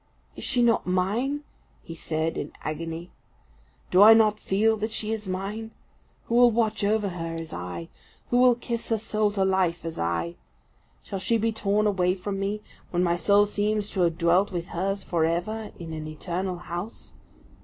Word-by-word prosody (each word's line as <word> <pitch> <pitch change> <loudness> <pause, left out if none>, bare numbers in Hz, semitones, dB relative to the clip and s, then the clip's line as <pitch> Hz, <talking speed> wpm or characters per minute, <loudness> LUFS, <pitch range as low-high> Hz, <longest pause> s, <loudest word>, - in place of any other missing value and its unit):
"Is - - -8
she 250 -2 +2
not 230 -4 +2
mine?" 220 +11 0 0.4
he 165 - -8
said, 160 0 -2
in 145 - -5
agony. 165 +3 -5 0.8
"Do 185 - +6
I 220 +2 +10
not 215 -1 +4
feel 220 +3 +2
that 215 +1 -2
she 220 0 -2
is 210 -2 -5
mine? 200 +4 -4 0.6
Who - - -4
will 245 0 +7
watch 220 -2 0
over 210 0 +2
her 165 -2 -5
as 165 -1 -6
I? 90 -1 -5 0.4
Who 245 - +4
will 250 -1 +6
kiss 235 -1 -4
her 225 - +2
soul 215 -1 0
to 195 -2 +1
life 185 -3 +1
as 165 - -5
I? 85 0 -1 0.7
Shall 195 - -5
she 230 +4 +2
be 225 +1 +1
torn 210 -1 +1
away 185 -3 +2
from 195 +1 -4
me, 205 +2 -2 0.3
when 175 0 +1
my 170 -1 +2
soul 200 +4 +4
seems 210 0 -1
to 190 - -1
have 170 -2 +2
dwelt 175 +4 +3
with 175 -2 -4
hers 195 +3 -2
for 170 -2 0
ever 195 +7 -1
in 165 -2 -7
an 155 -1 -5
eternal 180 +4 -3
house? 175 +5 -7
195 Hz, 185 wpm, -26 LUFS, 170-215 Hz, 0.8 s, I